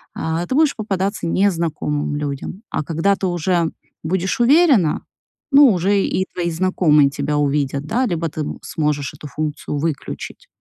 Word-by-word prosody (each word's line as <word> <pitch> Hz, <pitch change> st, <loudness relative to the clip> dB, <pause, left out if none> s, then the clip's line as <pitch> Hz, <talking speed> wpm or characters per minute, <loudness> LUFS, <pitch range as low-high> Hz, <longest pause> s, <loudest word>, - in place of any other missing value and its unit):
а, 160 Hz, +2 st, -2 dB
ты 260 Hz, -, -1 dB
будешь 305 Hz, -2 st, +3 dB
попадаться 200 Hz, -3 st, -2 dB
незнакомым 165 Hz, -6 st, 0 dB
людям, 145 Hz, +7 st, -5 dB
а -, -, -1 dB
когда 165 Hz, +6 st, +1 dB
ты 195 Hz, -, -2 dB
уже 175 Hz, -1 st, 0 dB, 0.3 s
будешь 185 Hz, +5 st, -1 dB
уверена, 255 Hz, -, +4 dB, 0.5 s
ну, 280 Hz, 0 st, +8 dB
уже 195 Hz, +3 st, +2 dB
и 190 Hz, -, 0 dB
твои 170 Hz, -1 st, -1 dB
знакомые 160 Hz, -4 st, +3 dB
тебя 150 Hz, +1 st, -2 dB
увидят, 140 Hz, -1 st, 0 dB
да, 250 Hz, +7 st, +1 dB
либо 170 Hz, -4 st, -1 dB
ты 155 Hz, 0 st, -4 dB, 0.2 s
сможешь 150 Hz, -3 st, -2 dB
эту 150 Hz, -, -9 dB
функцию 150 Hz, 0 st, -4 dB
выключить. 155 Hz, 0 st, -4 dB
170 Hz, 145 wpm, -20 LUFS, 150-195 Hz, 0.5 s, ну